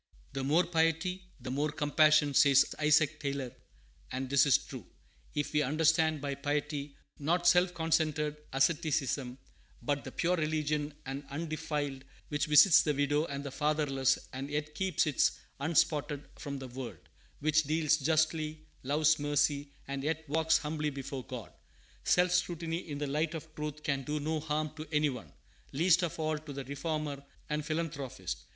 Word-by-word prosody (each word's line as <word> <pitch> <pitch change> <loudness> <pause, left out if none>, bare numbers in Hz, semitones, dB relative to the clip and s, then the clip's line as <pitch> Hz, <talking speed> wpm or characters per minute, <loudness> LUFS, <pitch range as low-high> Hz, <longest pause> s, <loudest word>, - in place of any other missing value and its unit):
"The 135 - -3
more 155 +6 +3
piety, 170 +2 0
the 125 0 -6
more 145 +3 0
compassion," 150 -1 +4
says 140 0 +5
Isaac 155 0 +3
Taylor; 140 -3 -3 0.6
and 130 +1 -4
this 140 +1 +5
is 135 - +6
true, - - -10 0.5
if 145 +1 -2
we 150 - +3
understand 155 +1 +2
by 140 -1 -2
piety, 145 0 -3 0.2
not 170 +4 0
self 180 0 +4
concentred 160 -2 +1 0.2
asceticism, 140 -3 0 0.5
but 145 +3 -1
the - - -7
pure 175 +2 +1
religion 150 -1 -1
and 135 +2 -5
undefiled 145 -3 -3 0.3
which 150 +1 -1
visits 150 +4 +8
the 150 -2 0
widow 145 +2 +1
and 140 -2 -5
the 140 - -5
fatherless, 145 -3 +1 0.2
and 135 +2 -5
yet 150 0 -3
keeps 190 +3 +1
itself 150 -3 +2 0.2
unspotted 145 -1 +1
from 140 -2 -6
the 135 -1 -7
world, 120 -6 -7 0.4
which 155 +1 +2
deals 155 0 +2
justly, 155 +1 0 0.2
loves 150 +3 +2
mercy, 145 0 +1 0.2
and 140 0 -4
yet 160 +1 -2
walks 160 +2 +3
humbly 150 0 -2
before 135 -1 -6
God. 125 -4 -7 0.5
Self 180 0 +3
scrutiny 170 -2 0
in 145 - -4
the 145 - -2
light 155 +4 -1
of 160 0 -8
truth 150 0 -5
can 140 -3 0
do 150 +3 -3
no 155 +2 -1
harm 155 0 -2
to 155 +1 -6
any 150 -1 +2
one, 125 -3 -9 0.4
least 170 +4 +4
of 175 -3 -2
all 155 -1 0
to 150 -1 -9
the 140 0 -5
reformer 145 +1 -3 0.3
and 150 0 -1
philanthropist. 150 - -4
150 Hz, 160 wpm, -31 LUFS, 140-155 Hz, 0.6 s, visits